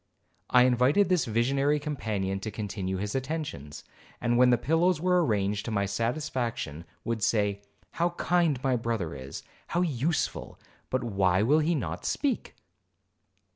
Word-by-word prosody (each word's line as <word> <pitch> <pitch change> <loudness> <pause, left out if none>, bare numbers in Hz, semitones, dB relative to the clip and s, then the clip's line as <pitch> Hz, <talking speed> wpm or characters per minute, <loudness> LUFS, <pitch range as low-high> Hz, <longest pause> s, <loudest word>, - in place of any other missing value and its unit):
I 125 0 +6
invited 130 +10 +3
this 180 -6 +2
visionary 135 +6 +1
companion 105 -10 -2
to 105 - -5
continue 100 -3 -4
his 100 +2 -3
attentions; 130 - -4 0.4
and 120 -1 +1
when 125 +1 +6
the 120 - +5
pillows 165 +7 +2
were 180 +1 +3
arranged 105 -5 0
to - - -3
my 100 -2 +1
satisfaction, 115 - -2 0.2
Would 115 -2 -2
say, 105 -1 +1 0.3
'How 170 +1 +1
kind 170 -5 +2
my 130 -2 +2
brother 115 -8 -2
is,—how 70 - -6
useful,—but 145 -3 -2
why 95 -4 +2
will 145 +7 +4
he 165 +2 +1
not 90 - -3
speak?' 280 -3 -1
120 Hz, 135 wpm, -28 LUFS, 100-150 Hz, 0.4 s, I